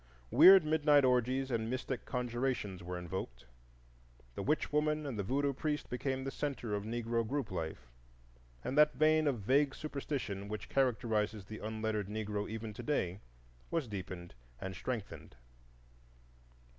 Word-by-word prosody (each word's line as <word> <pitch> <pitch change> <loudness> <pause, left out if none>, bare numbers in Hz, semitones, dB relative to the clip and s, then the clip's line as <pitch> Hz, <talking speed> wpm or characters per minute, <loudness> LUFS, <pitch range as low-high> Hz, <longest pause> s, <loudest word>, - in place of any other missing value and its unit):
Weird 190 -3 +9
midnight 150 -2 +4
orgies 130 +1 +2
and 115 -1 -1
mystic 130 0 -3
conjurations 120 -6 -2
were 90 +1 -5
invoked, 85 -9 -5 0.9
the - - -4
witch 150 +6 0
woman 150 0 +1
and 130 -7 -4
the - - +2
voodoo 140 +7 0
priest 150 +2 -2
became 130 +1 -2
the 135 - -3
centre 135 -8 -3
of 100 -1 -1
Negro 115 0 -1
group 135 +2 -2
life, 80 -8 -5 0.7
and 130 - -2
that 150 -2 +6
vein 155 +2 +4
of 125 -7 0
vague 135 +6 +3
superstition 135 -9 -4
which 105 +1 -6
characterizes 110 -6 +1
the 110 +2 -8
unlettered 110 -1 -2
Negro 105 -1 -3
even 110 0 -5
to - - -7
day 95 -11 -1 0.5
was 165 -6 -1
deepened 90 - -6 0.3
and 95 0 -5
strengthened. 105 - -5
120 Hz, 145 wpm, -34 LUFS, 105-140 Hz, 0.9 s, Weird